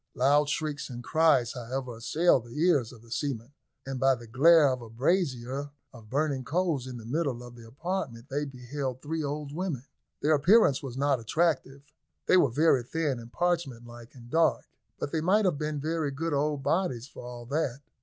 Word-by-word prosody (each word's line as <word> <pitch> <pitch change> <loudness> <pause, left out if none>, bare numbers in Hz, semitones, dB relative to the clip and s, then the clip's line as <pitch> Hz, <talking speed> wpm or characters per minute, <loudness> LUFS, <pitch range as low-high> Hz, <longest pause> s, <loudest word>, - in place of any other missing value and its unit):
Loud 145 +3 +3
shrieks 150 -2 -2
and 120 -1 -7
cries, 145 -6 +3
however, 125 0 -5
assailed 140 +1 +2
the 120 +5 -8
ears 155 -9 +3
of 115 -3 -15
the 115 - -18
seamen, 130 -1 -3 0.3
and 135 -1 -4
by 135 0 +4
the 120 -1 -11
glare 150 +7 +6
of 130 -1 -2
a 115 - -10
brazier 135 - -1 0.2
of 115 -4 -14
burning 140 0 0
coals 160 -3 0
in 125 -1 -6
the 115 - -10
middle 130 -2 -1
of 120 0 -11
the 115 -1 -13
apartment 135 -3 -4
they 145 +1 -2
beheld 130 0 -5
three 160 +1 -2
old 145 0 -4
women. 160 -7 -3 0.4
Their 155 +2 +3
appearance 155 - +5
was 130 -2 -7
not 140 -1 +2
attractive; 140 +2 0 0.4
they - - +4
were 175 -7 +5
very 145 +1 +3
thin 140 0 -2
and 115 0 -11
parchment 165 -9 -1
like, 120 0 -12
and 120 -2 -13
dark; 160 +5 +2 0.3
but 140 - -4
they 160 - 0
might 200 +6 +3
have 170 -6 +1
been 150 -1 -2
very 155 0 -1
good 155 +4 -3
old 145 0 0
bodies 140 -5 0
for - - -11
all 120 -1 -8
that. 140 -1 -2
140 Hz, 195 wpm, -28 LUFS, 120-155 Hz, 0.4 s, glare